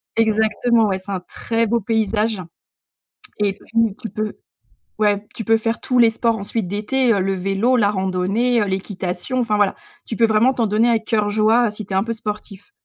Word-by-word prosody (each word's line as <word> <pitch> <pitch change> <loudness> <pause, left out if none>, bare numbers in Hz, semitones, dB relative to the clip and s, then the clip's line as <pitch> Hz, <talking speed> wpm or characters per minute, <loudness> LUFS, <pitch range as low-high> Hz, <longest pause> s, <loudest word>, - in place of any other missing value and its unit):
Exactement, 220 +1 +2
ouais, 190 -1 -1
c'est 200 +2 -9
un 185 -2 -2
très 230 +5 -2
beau 235 +2 +1
paysage 215 -1 0 1.0
et 200 -2 +1
tu 225 -3 -1
tu 225 - -5
peu 215 +1 -3 0.7
ouais, 205 -1 +1
tu 225 - -5
peux 225 +2 +4
faire 225 +1 -2
tous 250 -1 0
les 230 -1 +6
sports 225 0 0
ensuite 200 -1 -3
d'été, 230 +5 +1
heu, 200 - +1
le 195 +1 0
vélo, 195 +7 +1
la 205 -3 +3
randonnée, 195 +5 0
heu, - - 0
l'équitation 190 +4 -3
enfin, 215 -3 +1
voilà. 205 -2 +2 0.3
Tu 225 - -4
peux 230 - +4
vraiment 220 +4 +3
t'en 230 -2 +1
donner 220 +3 +2
à 230 -1 +3
cœur 215 -2 0
joie, 220 +3 +3
heu, - - -1
si 210 -2 -7
tu 195 - -8
es - - +1
un 195 - +2
peu 230 - -2
sportif. 210 - -7
215 Hz, 205 wpm, -20 LUFS, 200-230 Hz, 1.0 s, les